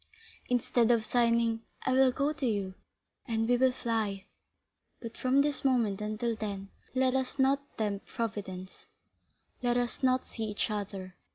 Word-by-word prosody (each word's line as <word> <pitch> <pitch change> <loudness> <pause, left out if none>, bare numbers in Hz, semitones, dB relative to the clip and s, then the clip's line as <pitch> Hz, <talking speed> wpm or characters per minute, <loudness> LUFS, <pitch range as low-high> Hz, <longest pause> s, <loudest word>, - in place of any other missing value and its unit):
"Instead 245 -1 +2
of 230 -2 +3
signing——" 230 -1 +2 0.2
"I 260 - +2
will 260 0 +5
go 280 +4 0
to 290 -4 -2
you, 200 -4 -1 0.5
and 225 -1 0
we 245 - +4
will 260 +1 +4
fly; 220 -6 -2 0.7
but 230 -2 -7
from 260 +2 +3
this 285 -2 0
moment 235 -7 +2
until 215 +2 -1
then, 200 -2 -5 0.3
let 260 0 +3
us 265 +1 -1
not 275 +1 +1
tempt 205 -2 -2
Providence, 195 -5 -5 0.7
let 245 -1 +2
us 245 +2 -1
not 255 -1 +3
see 225 - -4
each 210 +1 -1
other. 195 -3 -4
235 Hz, 155 wpm, -31 LUFS, 210-255 Hz, 0.7 s, will